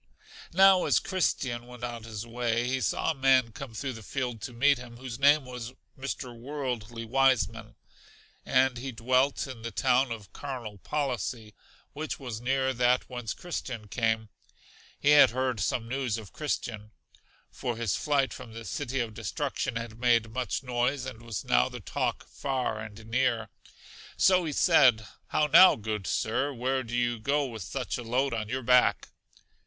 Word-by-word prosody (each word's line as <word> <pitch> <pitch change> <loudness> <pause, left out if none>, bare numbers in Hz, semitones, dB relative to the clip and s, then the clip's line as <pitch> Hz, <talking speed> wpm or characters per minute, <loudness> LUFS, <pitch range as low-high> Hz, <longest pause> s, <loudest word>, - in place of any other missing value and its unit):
Now 190 0 +7
as - - +4
Christian 130 -10 -1
went 125 -1 -11
on 120 -2 -5
his 110 -1 -6
way 120 0 -1
he 130 +1 -1
saw - - +1
a - - -2
man 130 -4 +3
come 120 0 -9
through 130 +3 -3
the 115 - -9
field 125 -1 -4
to 125 - -5
meet 135 +3 +3
him, 120 -1 -11
whose 125 -1 -7
name 145 0 +5
was 125 -1 -7 0.2
Mr. 130 -2 -5
Worldly 120 -3 -5
Wiseman, 130 0 +1 0.7
and 130 -1 +2
he 135 +2 -5
dwelt 130 +4 +1
in 130 -4 -9
the 115 - -4
town 125 +6 +2
of 105 -4 -7
Carnal 120 -8 -6
Policy, 120 -5 -3 0.4
which 155 +2 -4
was 120 -5 -6
near 130 +1 +1
that 125 +1 +2
whence 120 -3 -4
Christian 125 -10 -5
came. 110 -1 0 0.7
He 145 - +4
had 150 - +8
heard 130 0 -1
some 115 +3 -1
news 125 -3 -1
of 110 -4 -10
Christian; 115 -8 -3 0.6
for 120 -2 -4
his 115 -4 0
flight 140 -3 +1
from 125 -3 -10
The 115 0 -8
City 135 0 -2
of 115 -2 -4
Destruction 130 +3 -3
had 115 -1 -5
made 115 -2 +2
much 125 0 -2
noise, 125 +2 0
and 125 -3 -7
was 115 -3 -5
now 60 +1 +3
the - - -8
talk - - -3
far 130 -5 -2
and 110 0 -9
near. 115 -2 0 0.7
So 185 -2 +4
he 155 - -2
said, 115 -5 +5 0.2
How 150 - +2
now, 170 +5 +8
good 105 -3 -4
Sir, 125 - 0
where 130 +1 -1
do 120 -1 -5
you 120 -1 0
go 140 +5 +1
with 115 -5 -7
such 125 +9 -4
a - - -5
load 125 +3 0
on 110 -2 -3
your 130 +1 -2
back? 125 +1 +4
125 Hz, 170 wpm, -28 LUFS, 115-135 Hz, 0.7 s, had